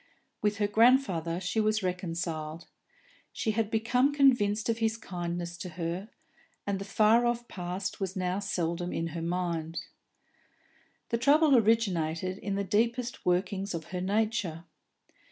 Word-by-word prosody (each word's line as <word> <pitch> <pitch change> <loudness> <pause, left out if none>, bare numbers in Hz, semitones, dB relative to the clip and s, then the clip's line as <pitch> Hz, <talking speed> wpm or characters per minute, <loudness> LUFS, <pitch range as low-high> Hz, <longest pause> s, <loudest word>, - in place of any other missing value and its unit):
With 210 -1 +1
her 205 - +2
grandfather 205 -7 +3
she 190 +4 -1
was 215 -1 +1
reconciled; 165 -3 -3 0.7
she 220 - -1
had 220 -1 0
become 245 +5 +2
convinced 240 -7 +3
of 230 0 0
his 225 0 +1
kindness 175 -4 -4
to 180 - -5
her, 175 +4 -3 0.6
and 200 -1 -1
the 195 - -5
far 220 +4 +4
off 240 0 -1
past 185 +1 -4
was 190 -2 -3
now 185 0 -1
seldom 175 -3 -2
in 165 0 -2
her 165 +1 -5
mind. 170 -1 -2 1.3
The 230 - 0
trouble 285 +3 +5
originated 185 -6 +1
in 200 -1 -3
the 200 - 0
deepest 235 +5 0
workings 190 +2 0
of 165 0 -7
her 180 - -2
nature. 200 -4 0
195 Hz, 140 wpm, -29 LUFS, 175-225 Hz, 1.3 s, trouble